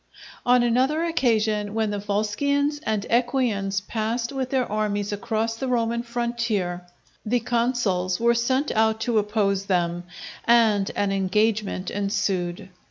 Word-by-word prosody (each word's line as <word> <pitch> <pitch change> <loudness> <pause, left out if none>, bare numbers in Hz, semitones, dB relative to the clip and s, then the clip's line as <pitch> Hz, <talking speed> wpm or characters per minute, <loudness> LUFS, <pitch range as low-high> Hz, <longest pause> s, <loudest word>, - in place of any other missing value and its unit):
On 245 0 +5
another 260 +7 +2
occasion 220 -10 +1
when 220 -2 0
the 205 - -2
Volscians 280 +9 0
and 215 -2 0
Equians 230 -6 +1
passed 230 +3 -2
with 265 -2 -2
their 260 -2 +1
armies 205 -1 -1
across 225 +1 -2
the 265 - -3
Roman 235 -1 0
frontier, 235 -7 -2 0.4
the 245 +3 +1
consuls 230 -7 0
were 235 +1 +4
sent 260 +5 0
out 220 0 +2
to 225 -1 +2
oppose 205 -2 0
them, 175 -2 0 0.4
and 220 -4 +4
an 200 -1 0
engagement 195 0 0
ensued. 195 -2 -2
220 Hz, 130 wpm, -24 LUFS, 200-240 Hz, 0.4 s, On